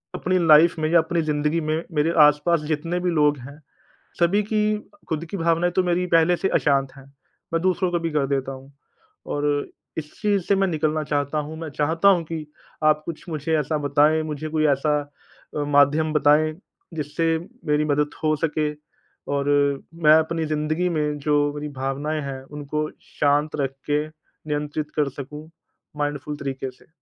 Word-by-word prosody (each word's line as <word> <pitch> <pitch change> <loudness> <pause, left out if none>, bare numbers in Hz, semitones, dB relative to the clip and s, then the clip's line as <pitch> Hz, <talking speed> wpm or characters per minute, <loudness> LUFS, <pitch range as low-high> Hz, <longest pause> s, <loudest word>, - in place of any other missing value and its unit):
अपनी 185 0 0
लाइफ़ 160 +2 +6
में 155 - +1
या 170 - +6
अपनी 165 +1 0
ज़िंदगी 150 +1 0
में 155 +2 -1
मेरे 150 +2 +2
आस-पास 150 +3 +3
जितने 165 +3 -1
भी 180 - 0
लोग 150 -2 +3
हैं 140 +4 -11 0.6
सभी 190 +5 +3
की 215 0 +2 0.3
ख़ुद 160 +1 -1
की 200 - -3
भावनाएँ 170 +1 +1
तो 185 - +4
मेरी 180 +1 +1
पहले 165 +2 +4
से 190 - 0
अशांत 135 -2 +1
हैं 135 - -13 0.5
मैं 165 0 0
दूसरों 185 0 +1
को 175 - +1
भी 165 0 -2
कर 140 -2 +2
देता 135 -1 -1
हूँ 135 +1 -12 0.5
और 145 0 -2 0.5
इस 150 -1 -5
चीज़ 205 -3 +1
से 200 - +3
मैं 195 - +2
निकलना 155 -1 0
चाहता 145 +1 -1
हूँ 160 +1 -8
मैं 160 - -5
चाहता 165 +6 +3
हूँ 185 -4 +4
कि 160 -1 -5 0.4
आप 155 0 +4
कुछ 165 -2 -6
मुझे 160 0 -1
ऐसा 150 +1 -1
बताएँ 145 +2 +3
मुझे 155 0 -4
कोई 155 0 +1
ऐसा 150 +2 +1 0.6
अ, - - 0
माध्यम 145 +2 +3
बताएँ 150 +1 +4 0.4
जिससे 160 +2 0 0.3
मेरी 150 0 +2
मदद 150 0 +1
हो 155 -1 +2
सके 155 -1 0 0.6
और 140 0 0 0.6
मैं 150 - +8
अपनी 160 +1 -1
ज़िंदगी 155 +3 0
में 150 -2 -1
जो 150 - +4 0.2
मेरी 150 0 -5
भावनाएँ 145 +3 -2
हैं 135 -1 -6 0.2
उनको 150 +1 -2 0.3
शांत 145 +1 +2
रख 135 -1 -1 0.2
के 150 +1 +1
नियंत्रित 150 -1 -5
कर 150 -2 +2
सकूँ 150 +3 -8 0.5
माइंडफुल 145 0 -3
तरीके 135 -2 -4
से। 125 - -23
155 Hz, 175 wpm, -23 LUFS, 145-165 Hz, 0.6 s, मैं